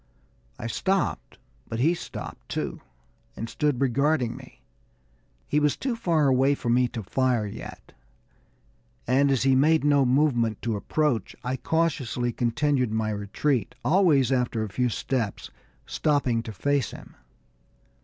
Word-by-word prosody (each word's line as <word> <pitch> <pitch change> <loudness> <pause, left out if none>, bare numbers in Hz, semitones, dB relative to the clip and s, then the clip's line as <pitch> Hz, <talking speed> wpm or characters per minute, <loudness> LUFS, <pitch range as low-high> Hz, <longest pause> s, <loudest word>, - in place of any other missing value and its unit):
I - - -7
stopped, 190 +11 -1 0.3
but 115 - -3
he 155 +7 +3
stopped, 175 - -8
too, - - -3 0.5
and 115 - -5
stood 145 0 0
regarding 140 -1 +1
me. - - -14 0.8
He 150 - +2
was 150 -1 +1
too 260 -3 -2
far 165 -9 +1
away 135 +2 +3
for 120 - -4
me 125 +1 +3
to 115 -2 -6
fire 125 +2 +1
yet, 100 - -9 1.1
and 135 +3 +3
as 135 -3 +2
he 135 0 +4
made 155 +4 +4
no 145 -1 +4
movement 125 -5 +2
to 115 -2 -1
approach, 125 +1 -1
I 125 +2 -1
cautiously 135 -6 -1
continued 125 +1 0
my 110 0 -1
retreat, 110 +6 -1
always 155 -7 +4
after 125 -3 0
a 110 - -4
few 125 +5 0
steps 115 -2 -3 0.3
stopping 140 -6 +1
to 115 - -7
face 140 +3 0
him. - - -12
130 Hz, 140 wpm, -26 LUFS, 115-150 Hz, 1.1 s, he